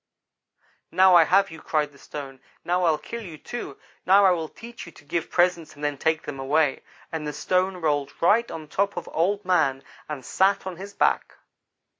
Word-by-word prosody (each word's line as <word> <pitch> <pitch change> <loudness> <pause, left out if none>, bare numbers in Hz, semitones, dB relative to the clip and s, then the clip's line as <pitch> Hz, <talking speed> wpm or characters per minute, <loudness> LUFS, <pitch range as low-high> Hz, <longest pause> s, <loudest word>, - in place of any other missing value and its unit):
"'Now 185 +2 +6
I 170 -2 +8
have 195 +2 +3
you!' 160 - -10
cried 150 -2 0
the 140 - -19
stone 135 -2 -8 0.3
'now 180 +1 +1
I'll 160 -2 +3
kill 235 +9 -7
you, 170 -7 -9
too! 240 +9 -7 0.3
Now 195 +2 +6
I 190 - +6
will 165 -3 -1
teach 235 -4 -11
you - - -10
to 150 - -18
give 165 +3 -2
presents 175 -3 +1
and 145 - -12
then 145 -1 0
take 160 0 +1
them 140 -2 -6
away,' 145 +1 +1 0.3
and 155 -2 -4
the - - -2
stone 185 +5 0
rolled 145 -4 0
right 225 +7 +3
on 155 -1 -7
top 200 +5 -1
of 175 - -5
Old 195 +5 0
man, 140 -8 +2 0.3
and 140 -4 -6
sat 195 +1 +2
on 185 -2 -5
his 200 +2 -9
back. - - +1
170 Hz, 200 wpm, -25 LUFS, 150-190 Hz, 0.3 s, I